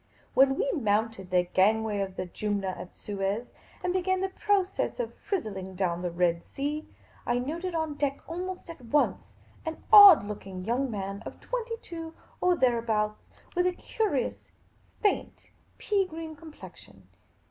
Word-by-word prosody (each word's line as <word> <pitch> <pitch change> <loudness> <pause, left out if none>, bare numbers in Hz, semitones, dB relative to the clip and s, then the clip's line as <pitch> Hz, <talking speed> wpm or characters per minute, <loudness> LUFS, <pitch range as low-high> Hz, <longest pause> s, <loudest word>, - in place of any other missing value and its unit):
When 270 0 +5
we 470 - +1
mounted 215 - 0
the 180 -1 +3
gangway 210 +4 +2
of 195 -1 -3
the 185 - -3
Jumna 200 +1 -2
at 185 -1 -7
Suez, 205 +3 -3 0.3
and 360 0 0
began 375 0 +1
the 385 - 0
process 390 +3 0
of 485 - -2
frizzling 195 - -4
down 175 -2 0
the 180 - -1
Red 170 -1 +1
Sea, 295 +3 -4 0.4
I 240 - +1
noted 335 +8 -3
on 320 -2 -1
deck 285 -1 -1
almost 365 +2 -5
at 330 -6 -10
once 285 +5 0 0.3
an 320 0 -5
odd 405 - +11
looking 195 -3 -7
young 255 +4 0
man 195 -2 -4
of - - -9
twenty 470 -2 -3
two 330 -1 -7 0.3
or 360 0 +4
thereabouts, 225 -5 +1 0.3
with 360 +1 +3
a 365 - +1
curious, 390 - -2 0.5
faint, 410 - -1 0.3
pea 400 -3 +1
green 320 -1 -7
com 315 +1 -12
plexion. - - -13
270 Hz, 155 wpm, -28 LUFS, -, 0.5 s, odd